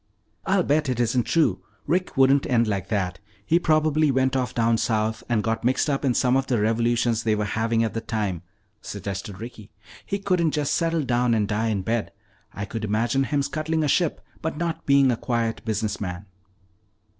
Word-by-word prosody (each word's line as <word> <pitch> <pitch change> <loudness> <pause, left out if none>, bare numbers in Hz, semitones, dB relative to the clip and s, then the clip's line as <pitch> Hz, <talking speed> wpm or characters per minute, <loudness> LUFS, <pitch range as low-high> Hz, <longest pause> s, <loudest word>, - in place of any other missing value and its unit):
"I'll 190 -1 +3
bet 145 -1 +1
it 125 -2 -1
isn't 120 0 +1
true. 165 -2 +2 0.2
Rick 180 +2 -1
wouldn't 135 +1 +4
end 115 -2 +3
like 100 -3 -2
that. 95 -4 -2 0.3
He 170 +8 +3
probably 155 -2 +2
went 130 0 +1
off 125 -3 -1
down 115 -1 +2
south 110 0 0
and 115 -3 +1
got 115 0 -1
mixed 130 +4 +1
up 140 - -1
in 130 -4 +1
some 125 0 +3
of 135 0 +1
the 125 -4 +1
revolutions 115 +1 +1
they 110 -1 +1
were 105 0 -1
having 115 +2 0
at 115 - -2
the 115 - -3
time," 105 -7 -2 0.4
suggested 100 -1 -6
Ricky. 115 -2 -9 0.3
"He 200 - -2
couldn't 180 -5 +1
just 145 -1 0
settle 165 -2 +1
down 120 -2 +2
and 105 -2 +1
die 105 +3 0
in 100 -4 -1
bed. 115 +2 -1 0.4
I 100 - -5
could 110 +2 -6
imagine 115 +6 +1
him 140 +2 0
scuttling 155 +2 -1
a - - +1
ship 165 +3 +1 0.2
but 160 -1 -3
not 165 0 -3
being 140 -2 +5
a - - +1
quiet 115 -2 -2
business 110 -2 -2
man." 90 0 -5
120 Hz, 195 wpm, -24 LUFS, 110-145 Hz, 0.4 s, being